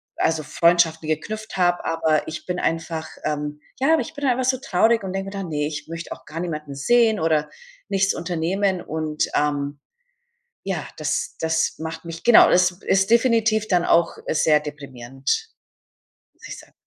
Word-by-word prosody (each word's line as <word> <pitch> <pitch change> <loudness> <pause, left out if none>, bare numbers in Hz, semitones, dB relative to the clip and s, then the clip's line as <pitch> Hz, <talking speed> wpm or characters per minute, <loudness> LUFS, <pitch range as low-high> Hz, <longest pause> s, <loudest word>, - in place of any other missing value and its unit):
also, 160 -1 +1
Freundschaften 165 +1 +2
geknüpft 215 +8 -4
habe, 175 -1 +1
aber 160 -2 +1
ich 160 - -6
bin 180 0 -2
einfach, 165 -1 -2 0.2
ähm, 150 0 -3 0.2
ja 310 +5 +4
ich - - -5
bin 285 0 -4
einfach 260 -1 +2
so 260 0 +2
traurig 225 -1 +2
und 190 -1 -4
denke 195 0 -3
mir 195 - -7
dann: 190 -3 -5
„Ne, 150 -1 -1
ich 150 -1 -6
möchte 165 0 -7
auch - - -16
gar 160 +2 -7
niemanden 155 -4 -4
sehen 220 - +3
oder 155 -2 +1 0.4
nichts 195 0 +1
unternehmen“, 180 +3 -1
und, 155 -1 -2
ähm, 145 -1 -1 0.8
ja, 190 -6 -3
das 150 -1 -2
das 160 0 0
macht 160 +1 -6
mich 165 0 -8
genau, 240 -1 +7
das 180 0 +5 0.2
ist 195 +1 +2
definitiv 225 -2 +3
dann 180 -4 +2
auch 170 0 +2
sehr 155 -1 +3
deprimierend. 140 - -4 0.9
Muss - - -13
ich - - -7
sagen. - - -15
165 Hz, 165 wpm, -22 LUFS, 155-195 Hz, 0.9 s, genau